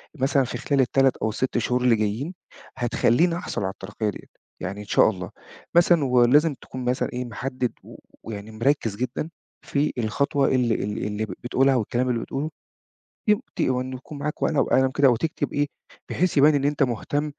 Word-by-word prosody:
مثلًا 135 -1 +2
في 125 - -4
خلال 140 -3 +2
3 135 +1 +2
أو 110 - -1
ال6 125 +3 -1
شهور 125 +2 0
اللي 120 -2 +5
جايين، 110 - -2 0.4
هتخليني 125 +7 +2
أحصل 140 - -4
على 95 - -1
الترقية 105 +3 -4
ديّة؟ - - -8 0.3
يعني 100 +3 -5
إن - - -9
شاء 105 - +4
الله. 90 -4 -5 0.5
مثلًا 170 -3 +5
ولازم 130 +5 +4
تكون 130 0 -8
مثلًا 125 +1 0
إيه 125 0 -3
محدد 125 +1 -3
و - - -13 0.3
ويعني 105 -1 -7
مركّز 115 -2 0
جدًا 125 +6 -3 0.3
في 145 +1 -1
الخطوة 135 +5 +1
اللي 125 -4 +2
اللي 105 +1 -3
اللي 105 +1 -2
ب 95 - -7
بتقولها، 135 +2 +3
أو 125 - +2
الكلام 125 +4 -1
اللي 120 -2 +1
بتقوله. 150 +4 -4 0.8
يم 210 +1 +4 0.2
ت - - -4
وإن 130 0 0
يكون 135 +3 -8
معاك 150 +1 -4
ورقة 145 -3 +2
وقلم 130 0 +3
كده، 135 0 +4
وتكتب 145 +4 -1
إيه، 145 0 +1 0.4
بحيث 180 -2 0
يبان 150 +2 +6
إن 140 -1 +1
أنت 145 0 +1
مُهتم 145 +4 0
130 Hz, 185 wpm, -24 LUFS, 115-145 Hz, 0.8 s, يبان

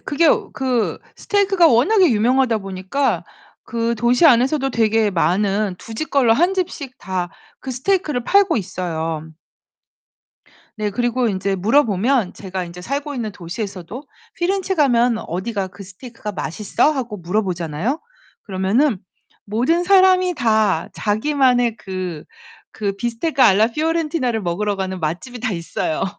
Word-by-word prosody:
그게 305 +3 +1 0.3
그 255 -4 -1 0.2
스테이크가 395 -4 +2
워낙에 345 - +4
유명하다 240 +1 +2
보니까 195 +7 -2 0.4
그 235 -1 -1
도시 240 +7 +3
안에서도 270 +1 +3
되게 225 -2 +2
많은 195 +3 +1
2 225 - -10
집 310 +8 -4
걸러 255 -5 +4
1 345 +10 +2
집씩 330 -8 -4
다 185 -2 -3 0.3
그 265 - -6
스테이크를 295 -1 -1
팔고 395 -3 +3
있어요. 165 -5 -3 1.5
네. 210 -1 -2
그리고 240 +3 0
인제 195 -1 -1
물어보면 225 0 +2
제가 190 -2 -5
인제 175 +1 -10
살고 285 +6 -3
있는 225 -5 -4
도시에서도 195 +4 -6 0.3
"피렌체 380 +2 -1
가면 245 -7 +3
어디가 190 +2 -3
그 200 - -12
스테이크가 210 +3 -9
맛있어?" 205 - 0
하고 245 -7 -4
물어보잖아요? 180 - -2 0.4
그러면은 205 +6 +1 0.5
모든 270 +11 +2
사람이 370 -1 +4
다 220 - +1
자기만의 245 +1 +1
그 185 -6 -6 0.5
그 205 -2 -3
비스테카 240 +6 0
알라 215 0 +5
피오렌티나를 305 -4 -1
먹으러 200 +4 -1
가는 190 -1 -4
맛집이 180 +11 -4
다 235 -2 -1
있어요. 165 -2 -2
230 Hz, 305 characters per minute, -20 LUFS, 190-275 Hz, 1.5 s, 알라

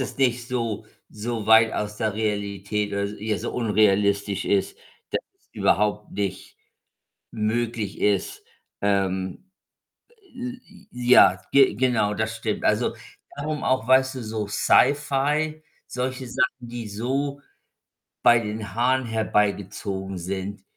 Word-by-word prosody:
ist 130 - -4
nicht 125 -2 +1
so 115 -4 -2 0.2
so 110 0 -4
weit 110 0 +6
aus 105 0 -3
der 110 0 -1
Realität, 105 -1 -2
oder 100 0 0 0.2
ja, 105 -2 -1
so - - -4
unrealistisch 100 -3 +2
ist, 100 -1 0 0.3
dass - - 0 0.2
es - - -37
überhaupt 105 0 +1
nicht 100 -2 -4 0.8
möglich 110 -1 -2
ist. 100 -2 0 0.4
Ähm, 95 - -1 0.8
j 250 0 -5
j 200 -1 -19
ja, 120 -7 +5
ge 135 -6 +5
genau, 115 -3 +1
das 110 +2 -2
stimmt. 110 -1 -3
Also, - - +1 0.4
darum 150 +1 -3
auch, 130 -2 +1
weißt 130 +1 +4
du, 130 - -5
so 110 -1 -3
Sci-Fi, 145 +7 +2 0.3
solche 130 +1 -3
Sachen, 125 +1 0
die 120 -2 -6
so 135 +7 -2 0.8
bei 120 0 +6
den 105 -2 -5
Haaren 130 +3 +2
herbeigezogen 100 -3 -1
sind. 95 +2 -5
110 Hz, 125 wpm, -24 LUFS, 100-125 Hz, 0.8 s, weit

